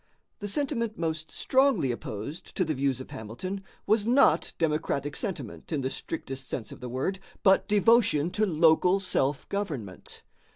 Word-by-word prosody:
The 205 - -4
sentiment 235 -2 -1
most 160 -1 -2
strongly 260 - +2
opposed 115 +6 -6
to 185 - +1
the 155 - 0
views 135 -2 0
of 130 - -9
Hamilton 185 - -6 0.2
was 215 0 +2
not 265 +3 +4
democratic 150 -3 -1
sentiment, 200 -5 -5
in 150 -4 0
the 130 0 -2
strictest 135 -4 -5
sense 115 - -4
of - - -10
the 125 - -6
word, 135 +10 -2 0.2
but 190 0 +5
devotion 205 -7 +4
to 215 +2 +1
local 170 +3 +4
self 145 -7 0
government. 150 - -5
165 Hz, 155 wpm, -28 LUFS, 135-205 Hz, 0.2 s, but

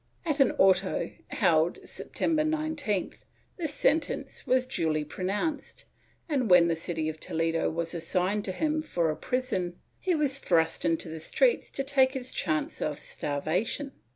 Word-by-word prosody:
At 305 -3 0
an 270 - +5
auto 190 0 +3 0.2
held, 170 -5 +2
September 315 -2 -1
19th, 310 - -1 0.4
this 320 -5 -1
sentence 285 -3 0
was 255 0 +3
duly 155 - -1
pronounced 205 - -3 0.4
and, 270 - 0
when 180 -2 +7
the 165 - +2
city 160 -1 -2
of 155 0 -4
Toledo 165 +1 0
was 165 +1 -3
assigned 180 +4 0
to 190 - -2
him 310 +9 0
for 170 - 0
a - - -3
prison, 185 -4 -2 0.2
he 365 -2 +1
was 280 -3 +2
thrust 165 -8 +1
into 165 0 +1
the 160 0 -6
streets 480 - +2
to 275 - -3
take 270 -1 +3
his 255 -1 -3
chance 155 0 -1
of 150 -1 -1
starvation. 175 - -2
195 Hz, 155 wpm, -28 LUFS, -, 0.4 s, when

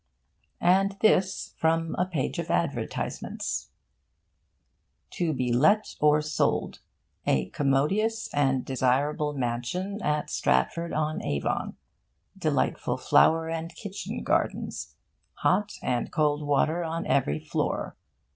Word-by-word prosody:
And 195 +2 +3
this 190 -3 +2
from 165 0 +1
a 180 - 0
page 160 -8 -2
of - - -4
advertisements: - - -2 1.4
To 170 -3 -1
be 125 -4 -1
let 205 - +3
or 150 0 +4
sold. 155 0 0 0.5
A 65 -2 +2
commodious 190 +12 +1
and 135 -3 +1
desirable 140 +3 +1
Mansion 140 - -3
at 150 0 -1
Stratford 170 - +1
on 155 0 -1
Avon. 70 -1 -2 0.6
Delightful - - 0
flower 160 0 +4
and 165 +1 -4
kitchen 200 +2 -6
gardens. - - -1 0.4
Hot 205 +3 +1
and 120 -1 -1
cold 150 -2 +1
water 155 +4 +2
on 165 0 -3
every 75 - +1
floor. - - -2
155 Hz, 110 wpm, -27 LUFS, 135-180 Hz, 1.4 s, or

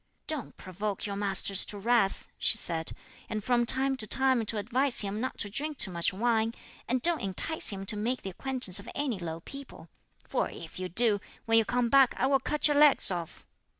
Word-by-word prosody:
"Don't 305 -6 -5
provoke 195 +2 -5
your 200 -1 -4
master 200 -1 -1
to 205 +1 +4
wrath," 210 -1 0
she 225 - +3
said, 165 -5 -4 0.4
"and 215 -1 -4
from 240 0 +1
time 270 +2 +2
to 215 - -4
time 260 0 +2
do 220 0 -3
advise 250 +6 +1
him 205 +1 -4
not 260 - -4
to 205 - -1
drink 290 +8 -2
too 210 -7 +2
much 170 -1 0
wine; 225 +2 0 0.3
and 255 0 -1
don't 340 -1 +2
entice 200 - +2
him 195 -1 -2
to 210 - +2
make 235 +5 -3
the 195 - -5
acquaintance 250 -2 +2
of - - -10
any 270 -8 -2
low 165 -1 -6
people; 270 -9 -11 0.4
for - - -1
if 165 +1 -10
you 185 0 -5
do, 215 +2 +3 0.3
when 225 0 +4
you 225 - 0
come 245 +2 0
back 270 0 +4
I - - 0
will 270 0 +2
cut 300 +2 +1
your 295 -1 +1
leg 295 -1 +6
off." 170 -3 -6
225 Hz, 210 wpm, -28 LUFS, 195-260 Hz, 0.4 s, leg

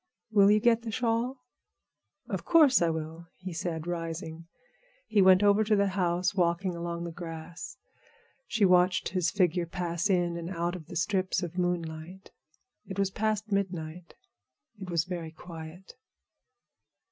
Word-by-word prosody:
Will 200 -2 +6
you 210 +1 +5
get 235 +1 +3
the 230 - -6
shawl?" 235 +3 0 0.9
"Of - - -3
course 310 - +5
I 170 - +3
will," 160 +1 -5
he 185 -1 -7
said, 165 -2 -3
rising. 165 -1 -5 0.6
He 205 - +3
went 190 +1 +6
over 205 +1 +5
to 215 0 +2
the 200 -1 +2
house, 180 -1 0
walking 180 0 +1
along 170 0 -4
the 170 - -5
grass. 165 0 -8 0.7
She 215 -2 +2
watched 180 0 +3
his 185 -2 +1
figure 180 -4 +1
pass 170 +1 -2
in 175 -2 +1
and 170 0 -5
out 175 -1 -2
of 165 -4 -9
the - - -9
strips 185 +1 0
of 175 0 -5
moonlight. 175 +1 -3 0.6
It 190 - -6
was 195 -1 +1
past 215 +1 -1
midnight. 180 -4 -3 0.6
It 190 -2 -7
was 170 -2 +1
very 170 -2 -5
quiet. 165 +2 -10
180 Hz, 150 wpm, -29 LUFS, 170-195 Hz, 0.9 s, Will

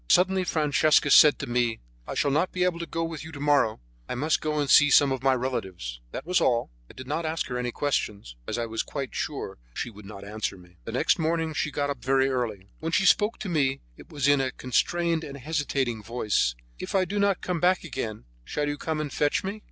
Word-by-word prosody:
Suddenly 185 +1 +4
Francesca 150 -2 +3
said 150 0 +8
to - - -4
me: 120 -2 0 0.3
"I - - -5
shall 140 - +1
not 155 +6 +1
be 180 - 0
able 180 -2 0
to 170 - -5
go 165 - -2
with 165 -2 -5
you 160 - -9
to 145 - -8
morrow; 145 -6 +2 0.3
I - - -2
must 155 +6 +1
go 155 0 -1
and 145 - 0
see 145 +2 +7
some 140 0 +5
of 130 -2 -2
my 135 0 +3
relatives." 95 - -4
That - - -6
was 180 +1 +2
all; 120 - +1 0.2
I - - -13
did 130 - -9
not 150 +5 -2
ask 160 0 -2
her 125 - -2
any 125 0 -2
questions, 105 - -2
as - - -2
I 120 - -1
was 115 0 -2
quite 140 -3 -5
sure 135 - -4 0.2
she 120 - -3
would 105 -1 -13
not 100 -1 -9
answer 105 -1 -4
me. 90 -1 -18
The - - -5
next 140 +9 +2
morning 160 0 0
she 150 - -1
got 145 -1 -1
up 135 -4 -7
very 135 +1 +3
early. 110 -7 -3
When 165 +1 -3
she 195 - +2
spoke 210 +4 +4
to 210 - -4
me 135 -5 +1
it - - -15
was 140 -2 -1
in 145 -1 +4
a 130 - 0
constrained 165 +7 0
and 140 -2 -7
hesitating 140 -5 -1
voice: 105 - 0 0.2
"If - - -5
I 190 -1 +3
do 205 +2 -2
not 200 -2 +2
come 180 -2 -2
back 180 +2 +2
again, 115 - -5 0.2
shall 150 - -2
you 145 0 -3
come 160 -1 -2
and 150 -2 -4
fetch 145 -1 +1
me?" 200 +3 -4
145 Hz, 240 wpm, -26 LUFS, 120-160 Hz, 0.3 s, said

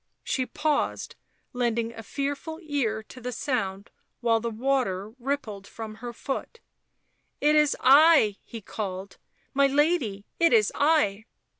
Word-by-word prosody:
She 255 -2 -1
paused, 300 -1 -1 0.4
lending 235 -2 -1
a 225 - -8
fearful 285 +6 -4
ear 245 -8 -1
to 255 +4 -13
the 250 +1 -4
sound 205 -6 -3 0.3
while 230 -2 +2
the 235 +1 -3
water 225 -4 -1
rippled 235 -7 -3
from 220 0 -8
her 240 -1 -5
foot. 275 - -5 0.4
" - - -47 0.3
It 300 +1 +3
is 300 -1 +3
I," 275 -6 +6
he 230 - -9
called. 195 -2 -6 0.2
" - - -40
My 280 0 +4
lady, 275 - +1
it 335 0 +4
is 435 -2 +4
I." 255 -9 +2
245 Hz, 145 wpm, -26 LUFS, 220-285 Hz, 0.4 s, I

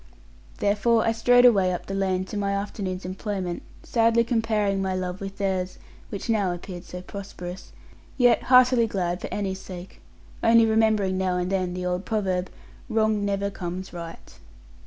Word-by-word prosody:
Therefore 215 +3 +2
I 225 - +3
strode 245 +2 +5
away 195 -6 +5
up 180 - -4
the 195 - -5
lane 190 -1 0
to 200 - -8
my 200 -1 0
afternoon's 195 -2 -4
employment, 185 -1 -3 0.2
sadly 230 0 +3
comparing 215 -4 0
my 190 -1 -1
love 185 0 -4
with 195 0 -6
theirs 190 -2 -1 0.3
(which 200 - -5
now 210 -5 +1
appeared 175 0 -7
so 180 0 -8
prosperous), 185 -2 -8 0.5
yet 245 -3 +5
heartily 250 -2 +6
glad 180 -3 -2
for - - -6
Annie's 195 -2 -3
sake; 180 0 -10 0.4
only 230 0 +6
remembering 220 -4 +2
now 185 -1 0
and 180 +1 -2
then 185 -2 -1
the 180 0 -4
old 180 +1 -1
proverb 190 -5 -1 0.4
'Wrong 220 -2 +1
never 200 0 -1
comes 185 0 -6
right.' 170 -1 -9
195 Hz, 160 wpm, -25 LUFS, 185-220 Hz, 0.5 s, heartily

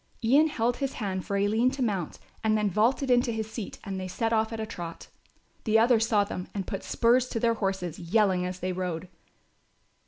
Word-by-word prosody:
Ian 280 +7 +5
held 245 -5 0
his 275 -1 -2
hand 190 -5 -3
for 200 - 0
Aline 215 +5 +2
to 270 -1 -1
mount 195 -8 -2 0.3
and 215 0 +3
then 210 -2 0
vaulted 245 +7 +2
into 245 0 +3
his 220 -1 -4
seat 225 -3 -6
and 195 -1 -4
they 185 - -4
set 225 +5 -1
off 220 0 +1
at 225 - -5
a 220 - -2
trot. 175 -6 -8 0.5
The 220 -1 +3
others 225 0 +4
saw 210 -3 +3
them 185 -2 -5
and 195 -2 -2
put 195 - -4
spurs 250 +2 +2
to 230 - -2
their 230 0 +3
horses, 190 -6 -3
yelling 185 +1 +2
as 180 0 -4
they 185 0 -1
rode. 180 -1 -4
215 Hz, 210 wpm, -28 LUFS, 185-230 Hz, 0.5 s, Ian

